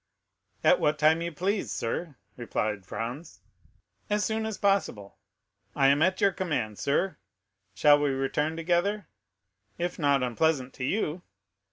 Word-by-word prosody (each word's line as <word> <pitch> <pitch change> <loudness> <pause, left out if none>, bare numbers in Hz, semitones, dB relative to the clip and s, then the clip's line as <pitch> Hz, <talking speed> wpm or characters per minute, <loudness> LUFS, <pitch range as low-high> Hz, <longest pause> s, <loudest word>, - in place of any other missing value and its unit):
"At - - +5
what 150 0 +1
time 155 +2 +4
you 170 0 -3
please, 195 +6 -2
sir," 145 +6 -3 0.2
replied 105 -5 -3
Franz. 120 +10 -6 0.7
"As 210 0 +1
soon 220 0 -1
as 220 - -4
possible." 195 - -1 0.6
"I 135 0 +4
am 140 +2 +3
at 185 +3 +2
your 200 -2 +4
command, 150 - -3
sir; 175 +7 0 0.6
shall 145 -1 +5
we 145 -1 +1
return 135 +4 -1
together?" 180 +5 0 0.7
"If 175 +1 -3
not 140 -3 +2
unpleasant 130 +1 0
to 125 - -4
you." 175 0 -1
155 Hz, 140 wpm, -28 LUFS, 135-185 Hz, 0.7 s, At